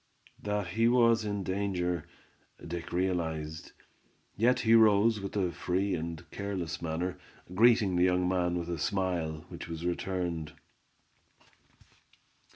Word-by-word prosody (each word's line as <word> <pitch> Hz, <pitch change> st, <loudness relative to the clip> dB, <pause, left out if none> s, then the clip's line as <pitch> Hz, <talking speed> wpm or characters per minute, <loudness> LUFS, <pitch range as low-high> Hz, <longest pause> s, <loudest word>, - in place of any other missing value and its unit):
That 105 Hz, -3 st, -2 dB
he 115 Hz, +5 st, +2 dB
was 115 Hz, -2 st, +4 dB
in 100 Hz, -1 st, -2 dB
danger, 90 Hz, -3 st, -1 dB, 0.6 s
Dick 85 Hz, 0 st, -6 dB
realized; 80 Hz, -4 st, -2 dB, 0.6 s
yet 120 Hz, +4 st, +3 dB
he 115 Hz, 0 st, +3 dB
rose 110 Hz, 0 st, +5 dB
with 100 Hz, +1 st, -6 dB
a 90 Hz, -3 st, +1 dB
free 95 Hz, +3 st, -1 dB
and 85 Hz, -2 st, -4 dB
careless 95 Hz, -5 st, -4 dB
manner, 85 Hz, +2 st, -3 dB, 0.3 s
greeting 110 Hz, -2 st, +4 dB
the 90 Hz, -, +4 dB
young 90 Hz, 0 st, +2 dB
men 90 Hz, -1 st, +1 dB
with 85 Hz, -1 st, -4 dB
a 85 Hz, -2 st, -3 dB
smile, 85 Hz, -5 st, -1 dB
which -, -, -8 dB
was 85 Hz, 0 st, -6 dB
returned. 85 Hz, -3 st, -2 dB
90 Hz, 125 wpm, -30 LUFS, 85-100 Hz, 0.6 s, rose